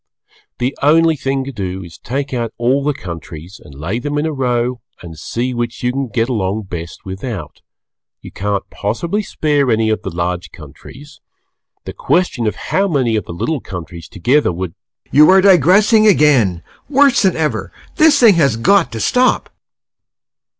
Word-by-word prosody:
The 125 +3 -2
only 160 +2 +4
thing 135 -1 -2
to 135 - -6
do 95 -5 -5
is 85 -2 -13
to - - -55
take 140 +3 -3
out 120 -2 -3
all 130 +4 +1
the 150 - +1
countries 85 - -9
and 70 - -14
lay 85 - -3
them 145 +3 -3
in 150 - 0
a 160 - -2
row 125 -3 -1 0.2
and 85 -2 -9
see 120 - -3
which 120 -1 -4
you 125 - +1
can 135 +1 -3
get 115 +1 -1
along 105 -3 -2
best 85 -3 -8
without; 95 - -7 0.6
you - - -12
can't 100 0 -3
possibly 165 - -2
spare 145 -8 0
any 110 -1 +2
of 110 - -1
the - - -5
large 85 +1 -3
countries; 130 - -14 0.6
the - - -6
question 180 - 0
is 105 - -1
how 195 +1 -1
many 130 -10 0
of 105 - -2
the - - -8
little 140 - -2
countries 85 -2 -8
together 125 +6 +1
would 90 -1 -5 0.4
You 150 +2 +6
are 190 +1 +7
digressing 200 - +5
again, 130 - +3 0.3
worse 280 -2 +4
than 190 -3 +2
ever! 155 -2 -2 0.3
This 310 -2 +5
thing 230 -4 +7
has 140 -9 +2
got 190 +10 +3
to 115 - -4
stop! 250 - +1
125 Hz, 175 wpm, -16 LUFS, 95-150 Hz, 0.6 s, are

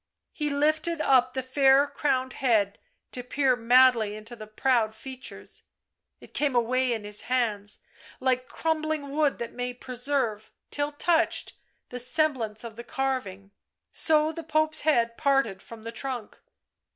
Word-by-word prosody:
He 300 -1 -2
lifted 310 +3 +1
up 255 -3 +3
the 260 - -1
fair 270 +1 +4
crowned 270 -2 -1
head 215 -6 +1 0.3
to 250 - -4
peer 260 +1 +1
madly 240 -3 +4
into 215 +3 -9
the 215 -2 -10
proud 220 -1 +1
features.... 260 +3 -9 0.6
It - - -16
came 285 -3 0
away 250 +2 +2
in 225 -3 -2
his 210 0 -1
hands, 215 -5 0 0.4
like 255 -1 0
crumbling 310 -3 -2
wood 295 -1 +1
that 235 - -6
may 245 0 -4
preserve, 250 -3 -2 0.2
till 290 0 -1
touched, 325 +3 +1 0.4
the 250 - -5
semblance 250 -5 0
of 230 -2 -8
the 235 - -7
carving... 240 -8 -3 0.4
so 310 -1 +3
the 330 - -6
Pope's 310 0 +1
head 235 -6 +2
parted 270 -10 +1
from 225 -1 -12
the 230 - -5
trunk. 245 -2 -5
255 Hz, 145 wpm, -27 LUFS, 230-290 Hz, 0.6 s, fair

